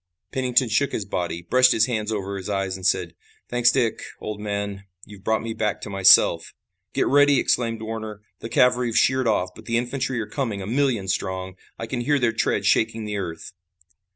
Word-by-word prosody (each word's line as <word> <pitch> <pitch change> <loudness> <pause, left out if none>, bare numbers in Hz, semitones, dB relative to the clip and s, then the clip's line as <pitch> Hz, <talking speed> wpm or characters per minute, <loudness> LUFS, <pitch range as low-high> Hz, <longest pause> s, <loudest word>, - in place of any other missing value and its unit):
Pennington 125 -1 +1
shook 125 +6 0
his 105 - -2
body, 85 -3 -3
brushed 130 +7 +4
his 110 - +3
hands 110 -3 -2
over 100 -2 -3
his 95 +1 -6
eyes 95 -2 -1
and 95 -1 -1
said: 90 -3 0 0.4
"Thanks, 120 -1 +3
Dick, 120 -4 0 0.2
old 105 -1 -6
man; 100 -1 -4 0.2
you've 100 -2 -14
brought 110 0 0
me 115 -1 -4
back 105 -2 -2
to 105 - -7
myself." 95 -1 +5 0.4
"Get - - +2
ready!" 145 -1 +4
exclaimed 115 -2 0
Warner. 110 -1 -6 0.2
"The 115 - -7
cavalry 125 +1 +3
have 115 -1 -1
sheered 130 -2 +3
off, 95 -4 +1
but - - -13
the 115 0 0
infantry 130 +1 -2
are 110 - -2
coming, 115 -2 -3
a 95 - -6
million 120 -3 0
strong! 95 0 -3 0.2
I 115 - -5
can 120 +1 -4
hear 145 +4 +2
their 120 -4 +1
tread 100 -3 0
shaking 110 +1 +1
the 105 -1 -3
earth!" 80 -4 -6
110 Hz, 200 wpm, -23 LUFS, 100-120 Hz, 0.4 s, myself